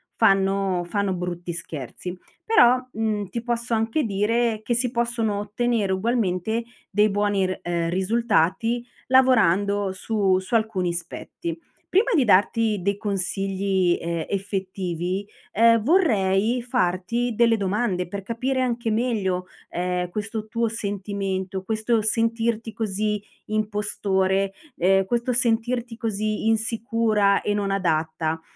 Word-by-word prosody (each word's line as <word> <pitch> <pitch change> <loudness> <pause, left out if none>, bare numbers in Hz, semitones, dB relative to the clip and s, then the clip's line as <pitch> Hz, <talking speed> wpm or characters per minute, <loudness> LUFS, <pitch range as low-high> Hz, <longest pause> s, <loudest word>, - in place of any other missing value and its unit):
fanno 195 -3 +2
fanno 200 -1 0
brutti 175 -1 -4
scherzi. 170 +2 -6 0.3
Però, 250 - +6 0.2
mhmm, 215 -3 -1
ti 235 +5 -4
posso 235 0 -2
anche 225 +7 0
dire 220 +2 +1
che 240 - 0
si 240 +1 +1
possono 235 -3 0
ottenere 210 0 0
ugualmente 220 0 0 0.3
dei 210 +1 +3
buoni 205 -1 +1
r 185 0 -3
ehm, 170 -1 -1
risultati, 225 +3 +1 0.2
lavorando 205 -6 +3
su 195 -2 +1
su 190 +5 -3
alcuni 215 -6 +1
aspetti. 170 -1 -6 0.3
Prima 405 +8 +2
di 275 - +4
darti 210 +1 +3
dei 200 +2 0
consigli, 195 -2 0
ehm, 170 -1 -2
effettivi, 190 -2 -3 0.3
ehm, 230 +1 +5
vorrei 230 - +2
farti 235 0 0
delle 230 0 +4
domande 195 -2 -1
per 200 +1 -4
capire 255 +5 -1
anche 240 -2 -1
meglio, 210 -6 0 0.2
ehm, 180 0 -2
questo 215 +2 -4
tuo 230 0 0
sentimento, 195 -3 -3
questo 220 +2 0
sentirti 225 0 0
così 210 -1 -1 0.2
impostore, 200 -2 0 0.2
ehm, 195 +2 +3
questo 240 +5 0
sentirti 235 0 0
così 215 -2 -2
insicura 225 -2 +2
e 205 - 0
non 205 -1 -1
adatta. 160 -3 0
205 Hz, 120 wpm, -24 LUFS, 190-230 Hz, 0.3 s, Però